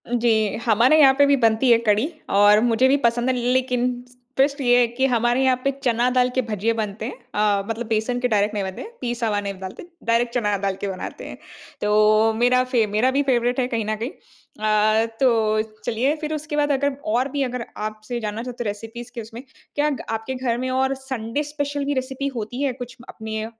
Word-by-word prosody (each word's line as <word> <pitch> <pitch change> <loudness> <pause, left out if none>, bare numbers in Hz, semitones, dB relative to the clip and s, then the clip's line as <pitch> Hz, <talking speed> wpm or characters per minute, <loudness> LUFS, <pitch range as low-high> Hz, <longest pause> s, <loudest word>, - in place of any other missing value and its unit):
जी, 225 -3 +1
हमारे 240 +7 +4
यहाँ 270 -3 +7
पे 285 - +6
भी 280 0 +4
बनती 230 +1 +3
है 230 - +7
कढ़ी, 220 +3 +2 0.2
और 205 +1 +5
मुझे 240 +2 +3
भी 275 +2 +4
पसंद 240 -1 +1
है 260 - +1
लेकिन 250 0 +1 0.5
ट्विस्ट 280 +2 +2
ये 245 -1 +4
है 245 - +5
कि 240 +3 -1
हमारे 240 0 +2
यहाँ 260 -1 +4
पे 275 - +2
चना 245 -1 +2
दाल 250 0 +2
के 260 - +3
भजिए 225 -1 -1
बनते 215 -1 -4
हैं। 250 - -4 0.5
अ, - - -4
मतलब 225 +1 -3
बेसन 225 +3 0
के 250 - +1
डायरेक्ट 210 -2 +1
नहीं 205 -2 -1
बनते 190 -1 -6
हैं, 450 - -9
पीसा 240 -2 -2
हुआ 205 -1 0
नहीं 200 -1 -4
डालते 190 - -8 0.2
डायरेक्ट 235 +1 +1
चना 210 -4 +1
डाल 195 0 -2
के 200 - -2
बनाते 190 -2 -6
हैं। - - -9 0.4
तो 215 +1 +4
मेरा 245 +3 +3
फेव 245 -4 +1
मेरा 225 +5 +2
भी 280 +2 +1
फ़ेवरेट 245 -1 +1
है 250 - +1
कहीं 230 -3 -2
न 215 +1 -1
कहीं। 230 +6 -4
अ, 215 +1 -1
तो 220 -4 +3 0.2
चलिए 255 +7 +1
फिर 310 0 -3
उसके 305 0 -4
बाद 295 0 +2
अगर 280 0 0 0.2
और 255 +3 +1
भी 285 0 0
अगर 250 -2 -3 0.2
आपसे 215 +3 -6
जानना 215 0 -4
चाहते 245 -1 -5
तो - - -3
रेसिपीज़ 225 +4 -8
के 235 - -4
उसमें 230 +3 -10 0.3
क्या 295 +1 +1 0.2
आपके 225 +4 -4
घर 250 -2 -1
में 255 +1 -2
और 265 +1 +1
संडे 260 0 -4
स्पेशल 285 -1 -3
भी 285 - 0
रेसिपी 265 +1 -3
होती 235 +3 -4
है 275 -3 0
कुछ 245 0 -9
अपने 220 -1 -5
240 Hz, 215 wpm, -22 LUFS, 220-260 Hz, 0.5 s, यहाँ